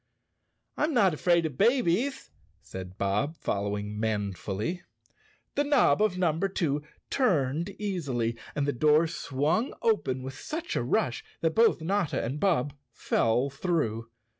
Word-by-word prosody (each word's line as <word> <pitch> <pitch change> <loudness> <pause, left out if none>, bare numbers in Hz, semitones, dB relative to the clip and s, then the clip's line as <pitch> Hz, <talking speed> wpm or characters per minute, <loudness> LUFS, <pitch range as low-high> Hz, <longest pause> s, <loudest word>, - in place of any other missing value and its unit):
" - - -48
I'm 300 -1 +1
not 195 -7 +4
afraid 170 +2 +2
of 145 -5 -5
babies," 240 +2 +2 0.3
said 95 0 -8
Bob 105 +11 0
following 105 +1 -2
man¬ 105 -3 -1
fully. 105 - -3 0.7
The 290 - +1
knob 275 - +4
of 215 -4 +2
Number 175 +1 +1
Two 150 -6 0 0.3
turned 170 - +1
easily 140 - -2 0.2
and 145 - 0
the 145 - +1
door 150 +5 +4
swung 160 - -1
open 135 - +1
with 135 +1 -6
such 320 - -5
a - - +1
rush 120 -1 0 0.2
that 165 -1 +1
both 230 -5 +4
Notta 190 -1 0
and 130 +6 -3
Bob 150 -7 +1 0.2
fell 125 +5 +1
through. 130 - -1
150 Hz, 140 wpm, -28 LUFS, 120-190 Hz, 0.7 s, not